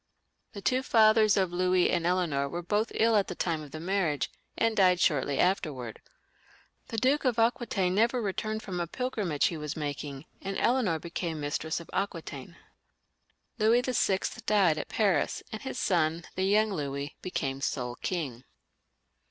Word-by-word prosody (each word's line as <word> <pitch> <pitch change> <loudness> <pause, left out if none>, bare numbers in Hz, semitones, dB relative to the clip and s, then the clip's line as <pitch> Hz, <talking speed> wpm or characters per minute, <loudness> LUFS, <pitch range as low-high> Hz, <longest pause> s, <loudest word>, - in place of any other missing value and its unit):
The 200 - -8
two 255 +5 +2
fathers 220 -4 +5
of 185 -3 +1
Louis 180 0 +3
and 170 -1 +1
Eleanor 165 -6 +1
were 175 +3 -4
both 210 +6 0
ill 225 0 +3
at 200 -2 +3
the 180 - -5
time 165 -3 -1
of 150 - -9
the 155 - -7
marriage, 170 -5 0 0.3
and 230 -1 +2
died 185 -3 +4
shortly 145 -4 +2
after. 180 -2 +2 1.2
The 225 - -5
Duke 265 +6 +2
of 250 -4 +1
Aqui 240 +1 +2
taine 185 -3 0
never 230 +5 +2
returned 215 +1 -2
from 180 -2 -4
a 170 - -1
pilgrimage 205 - -2
which - - +6
he 170 - -5
had 150 0 -3
been - - -6
making, 145 -1 -5 0.2
and 195 0 -4
Eleanor 235 -9 +2
became 170 0 -4
mistress 150 +2 -2
of 170 - -11
Aquitaine. 170 -5 -4 1.0
Louis 225 +3 +4
VL 210 -7 0
died 190 -7 +4
at - - -6
Paris, 195 -9 +1
and 220 - -6
his 265 - -5
son, 165 -6 +1
the 185 - -1
young 210 +1 +3
Louis, 140 -2 -4
became 135 -7 -3
sole 125 -3 -2
king. 140 -10 -3
185 Hz, 170 wpm, -29 LUFS, 155-215 Hz, 1.2 s, which